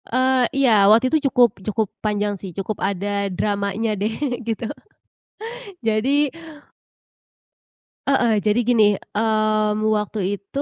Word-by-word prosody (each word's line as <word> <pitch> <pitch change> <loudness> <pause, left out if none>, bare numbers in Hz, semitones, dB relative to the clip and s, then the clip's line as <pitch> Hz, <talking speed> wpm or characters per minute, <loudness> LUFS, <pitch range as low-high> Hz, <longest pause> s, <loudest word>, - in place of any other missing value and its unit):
Eee, 255 0 +2
iya. 220 -7 +5
Waktu 235 +6 +4
itu 295 -3 +2
cukup 245 -7 +3
cukup 215 +2 -1
panjang 210 -1 -1
sih, 195 - -6
cukup 195 +1 -4
ada 200 +1 -1
dramanya 205 +3 -1
deh, 215 +2 0 0.3
gitu. 230 0 -3 1.2
Jadi 260 +6 +1 1.8
Heeh, 235 -6 +2
jadi 210 +3 +1
gini, 230 -3 +4
mmm, 215 0 0
waktu 210 0 -2 0.2
itu 275 +8 -5
215 Hz, 115 wpm, -21 LUFS, 205-240 Hz, 1.8 s, iya